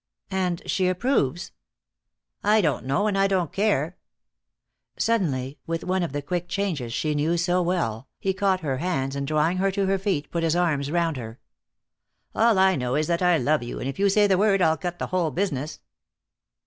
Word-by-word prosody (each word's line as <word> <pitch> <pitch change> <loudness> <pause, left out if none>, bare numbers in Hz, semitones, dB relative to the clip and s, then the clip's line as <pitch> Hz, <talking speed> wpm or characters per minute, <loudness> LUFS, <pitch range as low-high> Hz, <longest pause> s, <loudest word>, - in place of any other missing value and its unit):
"And 180 -2 -1
she 185 -2 +1
approves?" 180 - 0 0.9
"I 210 +2 +4
don't 150 - 0
know 140 +10 +1
and 210 -2 +1
I 195 0 +3
don't 185 -5 0
care." 190 -5 0 1.0
Suddenly, 145 - 0
with 165 0 -2
one 185 +1 0
of 170 - -2
the 145 0 -4
quick 175 +3 -3
changes 170 - -2
she 150 +5 -1
knew 155 +4 +1
so 180 +1 +1
well, 155 -10 -1
he 190 - -1
caught 190 -1 +1
her 135 -5 -2
hands 135 -4 -2
and 140 0 -3
drawing 155 +4 +1
her 195 +1 +2
to 195 0 0
her 195 0 +1
feet, 185 -7 -2
put 170 - -1
his 165 0 +1
arms 155 -6 +1
around 165 -2 0
her. 115 -1 -8 0.9
"All 225 -2 +3
I 190 0 +4
know 125 -2 -1
is 155 +1 +1
that 170 +2 0
I 180 -2 +4
love 150 +2 +1
you, 120 - -6
and - - -4
if 135 - -5
you 200 0 +4
say 205 +1 +4
the 190 -2 +3
word 200 -1 +3
I'll 160 -3 +3
cut 175 +2 -5
the - - -3
whole 175 -3 +2
business." 155 -3 -3
175 Hz, 200 wpm, -25 LUFS, 145-190 Hz, 1.0 s, I